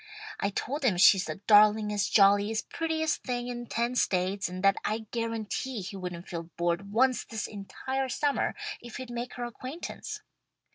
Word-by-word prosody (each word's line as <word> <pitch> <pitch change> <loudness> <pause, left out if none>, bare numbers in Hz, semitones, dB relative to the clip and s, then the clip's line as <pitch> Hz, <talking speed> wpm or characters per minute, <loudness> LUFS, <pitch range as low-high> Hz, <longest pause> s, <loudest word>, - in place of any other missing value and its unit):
I 200 - +1
told 275 +8 -3
him 215 -9 +3
she's 195 0 +7
the - - -6
darlingest, 210 -1 +5
jolliest, 205 +2 +4
prettiest 320 -1 -1
thing 245 -1 -3
in 240 -1 -5
ten 235 +2 -1
states, 190 -4 +1
and 185 +1 -6
that 195 0 +5
I'd 220 0 -3
guarantee 230 +1 -3
he 190 +2 -7
wouldn't 180 -2 -6
feel 170 -2 -6
bored 175 +3 -1
once 255 +3 +3
this 225 -2 -4
entire 260 +6 -4
summer 285 +3 0 0.3
if 240 -2 -8
he'd 255 -1 -7
make 240 +1 -5
her 245 - -4
acquaintance. 280 - -6
220 Hz, 160 wpm, -29 LUFS, 195-250 Hz, 0.3 s, she's